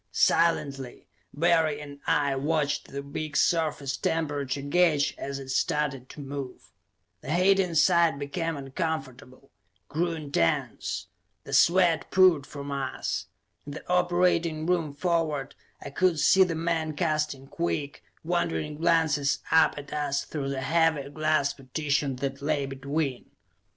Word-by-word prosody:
Silently, 140 -6 +1 0.3
Barry 160 -1 +2
and 145 -1 -10
I 140 -2 +2
watched 145 +1 -1
the 140 0 -6
big 145 +1 -4
surface 150 -5 +1
temperature 145 -3 -2
gauge 150 -1 +2
as 140 0 -5
it 135 -1 -9
started 135 -1 -1
to - - -11
move. 140 -2 -7 0.5
The 140 - -6
heat 190 +4 +4
inside 170 -3 +3
became 160 +3 -3
uncomfortable, 135 -3 -5 0.4
grew 170 +2 -1
intense. 140 - -1 0.4
The - - -8
sweat 175 -2 +4
poured 180 -7 +4
from 140 -1 -7
us. 135 -2 -3 0.4
In 145 - -6
the - - -9
operating 175 -3 +1
room 170 -4 0
forward, 150 -3 -1 0.3
I 145 - -7
could 175 +1 +2
see 190 +5 +6
the 175 -3 -2
men 160 -1 -1
casting 150 -4 -1
quick, 155 -3 -3 0.2
wondering 150 - -1
glances 160 -4 +2
up 160 -2 +4
at 145 -1 -8
us 145 -2 -1
through 140 -3 -4
the 135 -1 -3
heavy 160 -2 +1
glass 155 -2 +1
partition 140 0 -2
that 135 +1 -4
lay 145 -1 0
between. 135 0 -3
150 Hz, 130 wpm, -27 LUFS, 140-165 Hz, 0.5 s, see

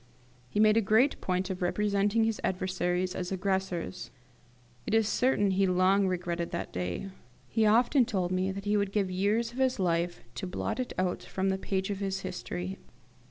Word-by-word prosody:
He 205 - -2
made 215 0 +5
a - - +5
great 225 +7 +3
point 185 +1 -1
of 185 - -5
representing 205 +3 +1
his 225 -1 -1
adversaries 185 -1 -1
as 180 -1 -4
the 195 - -1
aggressors. 190 -1 -2 0.8
It - - +1
is 225 -2 +3
certain 215 -4 +2
he 190 +1 +2
long 185 +2 +3
regretted 175 -2 -2
that - - -5
day. 90 - -3 0.4
He 220 - +2
often 240 +4 +4
told 185 -5 -1
me 185 +1 0
that 200 +1 -6
he 205 +1 +2
would 200 -1 0
give 200 -3 0
years 210 +5 +1
of 250 - -8
his 260 -1 +2
life 175 -2 0
to 190 - -5
blot 180 - -3
it 255 - -2
out 185 -1 0
from 190 0 -2
the 190 - +1
page 190 +1 -2
of 195 - -3
his 195 -1 -2
history. 185 0 -5
190 Hz, 190 wpm, -29 LUFS, 185-210 Hz, 0.8 s, made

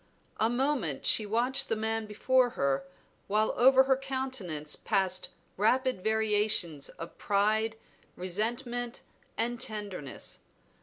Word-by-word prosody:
A 220 - +3
moment 240 - -1
she 215 - +3
watched 250 +5 +1
the - - +1
man 220 0 -1
before 255 +4 +2
her, 140 +5 0 0.4
while 215 +2 +1
over 265 +1 +6
her 265 0 +3
countenance 260 - -3
passed 185 -1 0 0.3
rapid 250 0 +1
variations 210 -8 +1
of 165 - -10
pride, 215 +2 +1 0.4
resentment, 235 +6 -3 0.3
and 235 +1 -1
tenderness. 205 - -2
220 Hz, 110 wpm, -30 LUFS, 195-250 Hz, 0.4 s, over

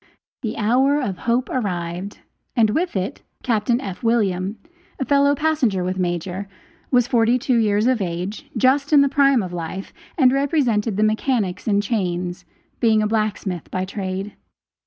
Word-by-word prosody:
The 225 -5 -4
hour 260 +7 +3
of 200 -10 -3
hope 245 +2 +2
arrived 185 -4 -3 0.3
and 220 -4 +4
with 340 +5 -1
it 190 +1 -3 0.2
Captain 235 0 +1
F. 195 -9 -6
William, 205 -4 0 0.4
a 265 - -1
fellow 280 +1 +3
passenger 270 -11 +1
with 185 +1 -2
Major, 180 +2 -2 0.4
was 245 -2 +4
forty 235 0 +3
two 255 -1 +1
years 210 -1 +2
of 250 -3 +2
age, 185 - -4
just 275 +3 +2
in 290 - +8
the 280 - +3
prime 275 -4 +3
of 180 -1 -6
life, 175 +3 -5 0.2
and 260 -5 +5
represented 255 -7 +1
the 215 - +2
mechanics 215 -3 0
in 205 -1 +3
chains, 180 -4 -2 0.3
being 220 -2 +3
a - - +1
blacksmith 210 -5 -2
by 185 0 -2
trade. 195 +1 -4
215 Hz, 155 wpm, -21 LUFS, 190-255 Hz, 0.4 s, in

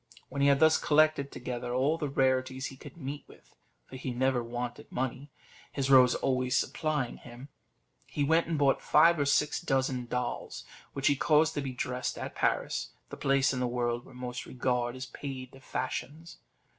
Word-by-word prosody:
When 140 +1 -3
he 140 - +5
had 140 -1 +4
thus 160 +1 +5
collected 155 -2 +3
together 125 0 -4
all 145 +6 +1
the 150 - -2
rarities 130 -1 +1
he 135 - -6
could 135 - -12
meet 145 -1 -6
with - - -19 0.3
for 130 - -10
he 130 - -5
never 130 -1 +1
wanted 120 +1 -6
money, 130 +3 -3 0.4
his 135 -1 -1
rose 125 -2 +7
always 130 -1 +1
supplying 150 -6 -1
him 125 +3 -12 0.6
he 145 - -2
went 160 +3 +3
and 165 -2 -1
bought 140 -2 +3
five 165 +2 +5
or 140 - +1
six 150 +2 +2
dozen 130 -5 0
of - - -20
dolls, 125 -1 -3 0.3
which 135 -1 -4
he 145 - +5
caused 155 +3 +3
to 145 - -2
be 135 -1 -4
dressed 125 0 -3
at - - -5
Paris, - - -1 0.2
the - - -5
place 135 0 +2
in 125 - -2
the 125 - 0
world 120 0 -1
where 130 - -15
most 125 0 -6
regard 125 -1 -1
is 130 0 -6
paid 130 -1 -7
to 135 - -14
fashions. 140 +5 -5
130 Hz, 190 wpm, -30 LUFS, 125-145 Hz, 0.6 s, rose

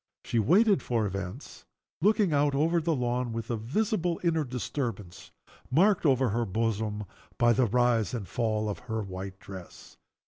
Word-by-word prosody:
She 115 - 0
waited 190 - +4
for 115 -3 0
events, 95 -2 -6 0.4
looking 205 -2 +3
out 145 -1 +2
over 165 +4 +2
the 160 0 0
lawn, 125 -1 -1
with 115 +1 -4
a - - +1
visible 175 - -1
inner 160 -3 +2
disturbance, 120 -6 -5 0.4
marked 180 +5 +3
over 130 -1 +3
the 115 +2 0
bosom 110 0 -1 0.3
by 120 -1 +4
the 125 +3 +3
rise 120 0 +2
and 105 -6 -5
fall 110 -2 -1
of 105 - -3
her 110 -1 -1
white 95 0 -7
dress. 95 -3 -11
120 Hz, 160 wpm, -28 LUFS, 105-150 Hz, 0.4 s, waited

